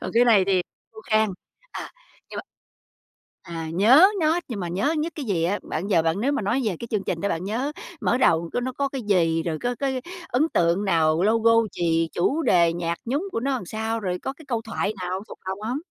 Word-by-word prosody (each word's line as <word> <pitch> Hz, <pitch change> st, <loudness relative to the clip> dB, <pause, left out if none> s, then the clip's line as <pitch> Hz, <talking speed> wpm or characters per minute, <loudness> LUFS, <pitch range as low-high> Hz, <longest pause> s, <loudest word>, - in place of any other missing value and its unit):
còn -, -, -4 dB
cái 240 Hz, +1 st, +6 dB
này 215 Hz, -5 st, +5 dB
thì 185 Hz, -2 st, +2 dB, 0.3 s
khô 220 Hz, -, -11 dB
khan. 215 Hz, 0 st, +4 dB, 0.4 s
À, -, -, -6 dB, 0.4 s
nhưng -, -, -8 dB
mà -, -, -4 dB, 1.1 s
à, 165 Hz, -1 st, -4 dB
nhớ 245 Hz, -, +7 dB
nó 320 Hz, +3 st, +3 dB
nhưng 225 Hz, -6 st, -5 dB
mà 175 Hz, -, -3 dB
nhớ 195 Hz, -, 0 dB
nhất 320 Hz, +2 st, -1 dB
cái 295 Hz, -, -5 dB
gì 180 Hz, -7 st, 0 dB
á? 195 Hz, +4 st, 0 dB
Bạn 175 Hz, +6 st, -4 dB
giờ 180 Hz, -5 st, +3 dB
bạn 165 Hz, +5 st, 0 dB
nếu 275 Hz, +4 st, +1 dB
mà 285 Hz, -, -1 dB
nói 235 Hz, +7 st, 0 dB
về 200 Hz, -, 0 dB
cái 235 Hz, -, -6 dB
chương 210 Hz, -3 st, 0 dB
trình 165 Hz, -, -3 dB
đó 200 Hz, -, 0 dB
bạn 165 Hz, -, -2 dB
nhớ 245 Hz, +9 st, -2 dB, 0.3 s
mở 245 Hz, -, +2 dB
đầu 165 Hz, -8 st, +2 dB
có -, -, +1 dB
nó 260 Hz, +1 st, -2 dB
có 275 Hz, +2 st, -1 dB
cái 270 Hz, -2 st, -5 dB
gì, 165 Hz, -6 st, +2 dB
rồi 160 Hz, -2 st, -2 dB
có 245 Hz, 0 st, -1 dB
cái 265 Hz, 0 st, -2 dB, 0.3 s
ấn 305 Hz, +6 st, +1 dB
tượng 175 Hz, +4 st, +1 dB
nào, 165 Hz, -2 st, +2 dB
logo 225 Hz, +2 st, +4 dB, 0.2 s
gì, 165 Hz, -1 st, 0 dB
chủ 280 Hz, -, +1 dB
đề, 170 Hz, -, +4 dB
nhạc 170 Hz, 0 st, -2 dB
nhúng 290 Hz, +11 st, -1 dB
của -, -, -1 dB
nó 275 Hz, +3 st, -1 dB
làm 195 Hz, -, -5 dB
sao, 220 Hz, +3 st, -3 dB
rồi 180 Hz, -3 st, -3 dB
có 265 Hz, -, -3 dB
cái 315 Hz, +2 st, -16 dB
câu 230 Hz, -3 st, -1 dB
thoại 220 Hz, -2 st, -2 dB
nào 185 Hz, +2 st, -3 dB
thuộc -, -, -11 dB
lòng 190 Hz, +1 st, -3 dB
hông? 240 Hz, +5 st, -2 dB
210 Hz, 240 wpm, -24 LUFS, 175-245 Hz, 1.1 s, nhớ